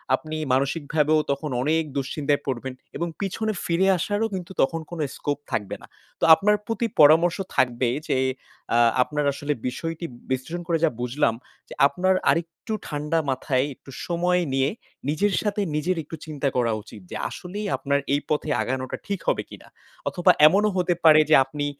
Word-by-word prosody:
আপনি 155 -1 -7 0.2
মানসিকভাবেও 150 +3 +1
তখন 145 +2 -3
অনেক 160 +4 +2
দুশ্চিন্তায় 145 +1 -1
পড়বেন 130 0 -3 0.2
এবং 170 - -2
পিছনে 215 +3 -1
ফিরে 175 +3 +2
আসারও 205 +6 0
কিন্তু 180 0 -6
তখন 165 +4 +1
কোনো 170 -2 -4
scope 145 0 -3
থাকবে 105 -3 -2
না। - - -13 0.3
তো - - -7
আপনার 210 +3 +3
প্রতি 230 +1 -1
পরামর্শ 160 +4 +6 0.2
থাকবে 125 -1 +2 0.2
যে, - - +1 0.6
আ - - +5 0.3
আপনার 150 +2 -2
আসলে 145 +1 -2
বিষয়টি 165 +6 -4 0.3
বিশ্লেষণ 135 +7 -2
করে 170 -2 +2
যা - - +3
বুঝলাম, 125 -1 +1 0.4
যে - - -8
আপনার 185 +4 +1 0.2
আরেকটু 165 +6 -1
ঠান্ডা 150 +2 -1
মাথায় 130 0 0
একটু 135 - -15 0.2
সময় 180 +1 +1
নিয়ে 135 +1 +2 0.4
নিজের 195 +6 +1
সাথে 210 -1 -1
নিজের 170 +4 0
একটু 155 - -8
চিন্তা 150 -3 -3
করা 120 -2 +2
উচিত। 105 - -13
যে - - -5
আসলেই 200 +4 -6
আপনার 140 0 0
এই 145 - +3
পথে 150 0 -1
আগানোটা 130 +2 -3
ঠিক 200 -3 -2
হবে - - +1
কিনা? - - -12 0.4
অথবা 175 - +4 0.2
এমনও 205 +5 +3
হতে 180 -1 +2
পারে 155 -1 +8
যে 155 - +7
আপনি 145 +2 -4
155 Hz, 165 wpm, -24 LUFS, 140-175 Hz, 0.6 s, পারে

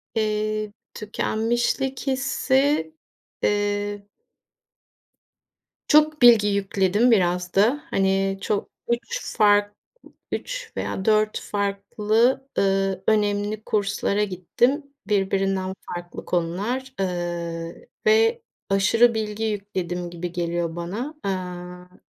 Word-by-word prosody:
eee, 215 -1 -1 0.2
tükenmişlik 240 +5 -1
hissi, 270 +3 +1 0.5
eee 205 0 0 1.8
çok 305 0 +4
bilgi 230 -4 +7
yükledim 200 +3 +2
biraz 180 -3 +2
da. 235 +10 +3
Hani, 195 -2 +1
çok 205 0 -1 0.2
3 235 0 -1 0.2
fark, 205 -1 +4 0.6
3 - - -4
veya 190 - -3
4 215 -1 +2
farklı, 210 +5 0
ııı, 195 -1 +1
önemli 210 0 +1
kurslara 210 0 0
gittim 210 - 0 0.2
birbirinden 195 -2 0 0.2
farklı 175 0 -8
konular, 205 +10 -2
ııı, 170 -2 -3 0.3
ve 455 +1 +4 0.3
aşırı 225 +5 +4
bilgi 215 0 -3
yükledim 190 -5 -3
gibi 175 0 -5
geliyor 170 -1 -2
bana. 205 - -4
Eee, 180 -1 -5
205 Hz, 90 wpm, -24 LUFS, 190-230 Hz, 1.8 s, bilgi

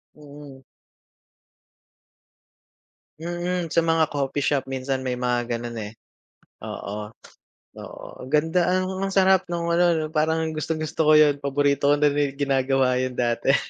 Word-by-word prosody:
Mm. 145 -2 -13 2.6
Mm, 175 0 -3
sa 165 0 +1
mga 165 -1 +2
coffee 145 0 -2
shop 140 -1 0
minsan 130 0 -3
may 130 - -1
mga 125 -1 -1
gano'n, 120 0 -5
eh. 105 - -9 0.7
Oo, 105 +1 -6 0.7
oo. - - -10
Ang 130 - -8
ganda, 160 +5 +2
ang 185 +1 0
ang 195 - -1
sarap 190 -1 +3
nung 170 -1 -2
ano 170 0 +3
'no, 155 -1 -3
parang 160 +1 0
gustong-gusto 155 0 -4
ko - - +7
'yon, 145 -2 +4
paborito 140 0 +1
ko 145 - +5
na 145 0 +3
rin 145 -1 -1
ginagawa 135 -2 +1
'yon 130 -1 -3
dati. 120 +3 +2
145 Hz, 140 wpm, -24 LUFS, 135-165 Hz, 2.6 s, ko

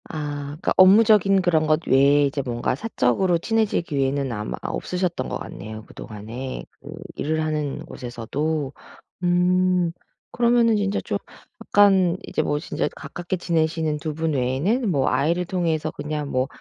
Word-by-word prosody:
아 145 -2 -4
그러니까 145 +4 -2
업무적인 195 0 +6
그런 160 -4 +2
것 155 +2 +1
외에 140 +2 +5
이제 140 0 -1
뭔가 120 -2 -2
사적으로 175 - +1
친해질 220 +1 0
기회는 140 -3 -1
아마 105 -1 -4
아 - - -4
없으셨던 180 -7 -2
것 - - -2
같네요 110 0 -8
그동안에 115 +5 -7 0.2
그 145 - -9 0.2
일을 155 +2 -1
하는 150 -3 -2
곳에서도. 135 +5 -3 0.5
음 180 0 +2 0.4
그러면은 235 -1 +3
진짜 205 0 0
좀 - - -3 0.4
약간 190 -3 +4
이제 - - -1
뭐 145 - 0
진짜 155 - -2
가깝게 175 +1 -5
지내시는 160 -2 0
2 150 0 -5
분 160 0 -1
외에는 145 - 0
뭐 140 -6 +1
아이를 165 +7 +1
통해서 165 -3 -1
그냥 150 0 -4
뭐 130 +1 +1
155 Hz, 320 characters per minute, -23 LUFS, 140-180 Hz, 0.5 s, 업무적인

